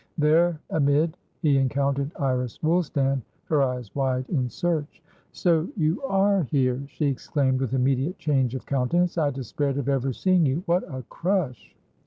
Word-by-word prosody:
There 160 +2 +3
amid, 150 +2 +2 0.3
he 145 -3 +4
encountered 140 +1 0
Iris 125 -3 -1
Woolstan, 145 -5 +1 0.2
her 150 -3 +1
eyes 125 -5 -2
wide 130 -2 -1
in 130 -7 0
search. 160 +3 -2 0.3
"So 170 -1 +1
you 160 +3 +1
are 200 -6 +2
here!" 130 -3 0
she 150 - -3
exclaimed, 135 -1 0
with 130 0 -1
immediate 135 +7 +1
change 135 -4 0
of 130 - -6
countenance. 170 +7 +1
"I 150 -2 +2
despaired 135 +1 -2
of 140 -2 -2
ever 135 -1 +1
seeing 185 +6 +2
you. 145 +4 0
What 175 0 +2
a 130 -1 -5
crush!" 165 - -2
140 Hz, 155 wpm, -25 LUFS, 130-165 Hz, 0.3 s, he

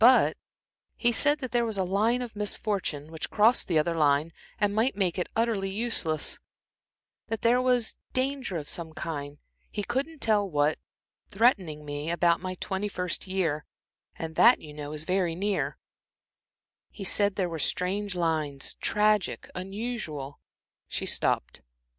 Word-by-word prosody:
But 250 +3 +6 0.6
he 240 - +2
said 290 +5 +3
there 245 -2 +1
was 220 -3 -2
a 190 - +2
line 215 +7 +1
of 230 -3 -8
misfortune, 195 -7 -1
which 160 - -5
crossed 225 +3 +4
the 170 - +2
other 165 +2 +2
line 150 +1 +2 0.3
and 205 -1 +2
might 225 +4 +2
make 185 -3 +1
it 180 - -2
utterly 225 -4 +1
useless; 190 -7 0 0.9
that 225 - -3
there 240 +2 +4
was 250 -3 +2 0.2
danger 260 -7 -1
of 150 -2 -6
some 165 -2 -4
kind 145 -3 -5 0.3
he 205 - -3
couldn't 275 +8 -2
tell 210 -5 +2
what, 150 -1 +1 0.5
threatening 185 - +2
me 145 +2 -4
about 170 0 +3
my 185 0 -4
twenty 190 +3 -2
first 180 -2 -3
year, 170 -6 0 0.5
and 160 -1 -5
that, 240 +2 +7
you 150 -1 -11
know, 150 0 -6
is 155 0 -2
very 180 -1 0
near; 200 +3 -1 1.1
he 200 - -8
said 200 +1 +3
there 190 -3 0
were 165 -2 -5
strange 190 +5 0
lines 155 -5 -1
tragic, 210 -2 +1
unusual," 185 - -5 0.5
She - - -3
stopped. - - 0
190 Hz, 150 wpm, -28 LUFS, 160-225 Hz, 1.1 s, that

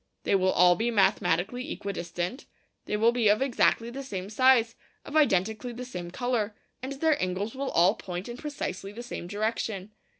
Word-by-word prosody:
They - - 0
will 190 -1 +3
all 180 0 +5
be 230 +4 0
mathematically 200 - +1
equidistant; 180 - -4 0.4
they 210 - -1
will 225 +2 +4
be 240 -2 +1
of 205 +1 +5
exactly 235 -3 +2
the 270 +3 -6
same 200 -7 -6
size, 240 -1 +4 0.3
of 290 - -8
identically 220 -3 +2
the 250 +2 -6
same 180 -8 -6
colour, 225 0 -1 0.3
and 265 +2 -4
their 310 +2 +1
angles 185 +4 -2
will 270 0 -3
all 175 +4 +4
point 180 -4 -6
in 240 - -6
precisely 200 - -5
the 235 +3 -8
same 240 -7 -6
direction. 210 0 -2
220 Hz, 175 wpm, -28 LUFS, 185-250 Hz, 0.4 s, all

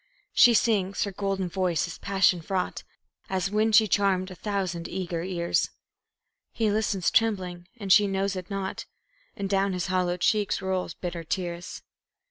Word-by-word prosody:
She 240 -1 +7
sings 200 -4 +2
her 200 - -3
golden 195 -1 -2
voice 180 -2 0
is 170 - -8
passion 190 -3 +2
fraught, 185 +2 -2 0.5
As 190 0 -1
when 215 +1 +2
she 215 0 +6
charmed 195 -2 +1
a - - -6
thousand 185 -3 -3
eager 175 -3 -3
ears; 175 -1 0 0.8
He 220 -2 0
listens 205 -4 0
trembling, 185 -6 0
and 200 -4 +3
she 205 -1 +6
knows 195 0 -1
it 185 -1 -6
not, 195 -1 -4 0.5
And 200 - -3
down 195 0 +1
his 180 -2 -2
hollow 180 -1 +1
cheeks 205 +3 +1
roll 190 -1 -2
bitter 175 -2 -4
tears. 175 0 -4
190 Hz, 155 wpm, -27 LUFS, 180-200 Hz, 0.8 s, She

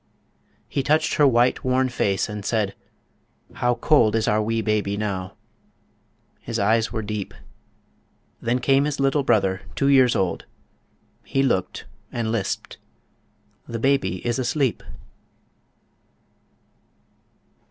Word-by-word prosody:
He 140 - -1
touched 150 +3 +1
her 150 -3 +4
white, 120 -1 +2
worn 130 0 +2
face, 100 -6 0
and 105 -1 -6
said, 105 -2 -1 0.8
"How 120 0 0
cold 120 -3 +3
Is 110 -1 0
our 105 +1 +2
wee 115 +1 -1
baby 105 -1 0
now."... 95 -3 -4 1.0
His 115 -1 -5
eyes 110 +2 +2
were 110 -2 -3
deep... 105 -1 -5 1.1
Then 120 +2 0
came 135 +2 +2
his 150 -1 -3
little 135 +1 +2
brother, 95 -7 +1
two 140 - +1
years 130 -3 +5
old, 95 -2 -1 0.8
He 135 - 0
looked, 95 -9 -1 0.3
and 115 -2 -2
lisped, 110 -4 -3 0.9
"The 115 - -4
baby 115 -8 0
is 120 +2 0
asleep." 130 0 0
115 Hz, 120 wpm, -23 LUFS, 105-130 Hz, 1.1 s, years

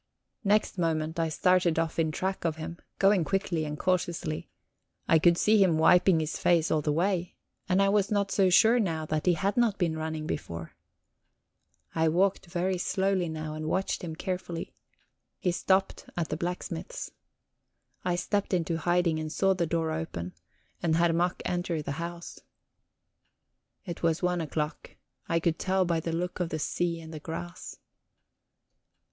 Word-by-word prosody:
Next 205 -2 +2
moment 160 -1 0
I 165 -1 +1
started 180 0 +2
off 165 0 -1
in 160 -1 +2
track 190 +5 -2
of 165 -2 0
him, 165 +2 -7 0.2
going 195 -2 +4
quickly 170 -1 -1
and 150 0 -4
cautiously; 175 -4 -1 0.6
I 165 - +5
could 170 +1 +5
see 215 +2 +4
him 170 -4 +3
wiping 180 +2 +5
his 155 -1 -3
face 170 -2 +3
all 155 - +2
the 150 - 0
way, 175 +2 0 0.3
and 190 +2 +4
I - - +3
was 200 -1 +2
not 200 -2 0
so 190 -2 +3
sure 225 +6 +6
now 165 -7 -1
that 155 +2 -2
he 175 - +5
had 195 +7 -1
not 230 -4 +3
been 170 -4 0
running 160 -1 -3
before. 85 - -5 1.2
I 160 0 +2
walked 190 +3 +1
very 180 +1 -1
slowly 190 -2 0
now, 155 -1 -4
and 155 0 -5
watched 190 +4 -1
him 160 -2 -5
carefully; 180 -1 -4 0.6
he 180 - 0
stopped 190 +2 0
at 170 -2 -1
the - - -1
blacksmith's. 180 - -4 0.9
I 180 -1 +1
stepped 200 +2 0
into 165 -1 0
hiding, 175 -1 +2
and 155 0 -4
saw 195 +3 +2
the 175 -3 -1
door 160 0 0
open, 155 - -4 0.5
and 160 -2 +2
Herr 170 0 +3
Mack 175 +2 0
enter 175 -3 -1
the 140 - -4
house. 170 0 -6 1.5
It 175 -3 -6
was 165 +1 +1
one 180 -1 +1
o'clock; 150 0 -4 0.3
I 165 -1 +2
could 165 -1 0
tell 190 0 +1
by 170 -2 +1
the 165 +1 -3
look 175 +3 -3
of 175 -2 -1
the 160 - -2
sea 170 +3 -1
and 160 0 -10
the 155 - -6
grass. 170 +2 -7
170 Hz, 170 wpm, -28 LUFS, 160-185 Hz, 1.5 s, sure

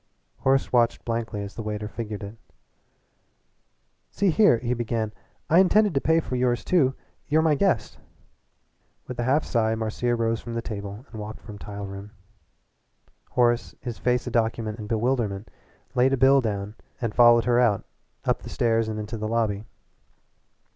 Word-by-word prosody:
Horace 135 0 +1
watched 120 -2 +2
blankly 115 -3 -2
as 100 - -7
the - - -6
waiter 105 -1 -4
figured 105 -2 -6
it. 100 +2 -7 1.7
"See 200 -3 +1
here," 205 - +5
he 120 +1 -1
began, 115 -2 -2 0.3
"I 165 - +5
intended 205 +1 +4
to 135 - +1
pay 160 0 +3
for 130 - -4
yours 125 -1 +1
too. 135 -8 +2 0.3
You're 155 +1 +3
my 160 -2 +4
guest." 145 - 0 1.1
With 125 -1 -7
a - - +1
half 135 +5 +2
sigh 110 -2 +1
Marcia 115 +2 -1
rose 115 -1 0
from 120 -1 -6
the 115 - -1
table 100 +2 -6
and 110 -2 -7
walked 105 +1 -7
from 105 -2 -10
the 100 0 -7
room. 100 +1 -7 1.2
Horace, 120 -1 +1
his 120 -3 -6
face 125 0 +1
a 125 - -4
document 115 -1 -1
in 105 - -6
bewilderment, 110 -3 -1 0.4
laid 130 +2 +3
a - - +2
bill 135 +1 +5
down 105 -3 -3 0.3
and 115 -4 -2
followed 120 -1 +6
her 120 0 +3
out, 115 -5 +2 0.4
up - - +1
the - - -9
stairs 115 -1 +1
and 110 -1 -3
into 110 +2 -5
the 110 - -2
lobby. 110 -2 0
115 Hz, 170 wpm, -25 LUFS, 110-125 Hz, 1.7 s, followed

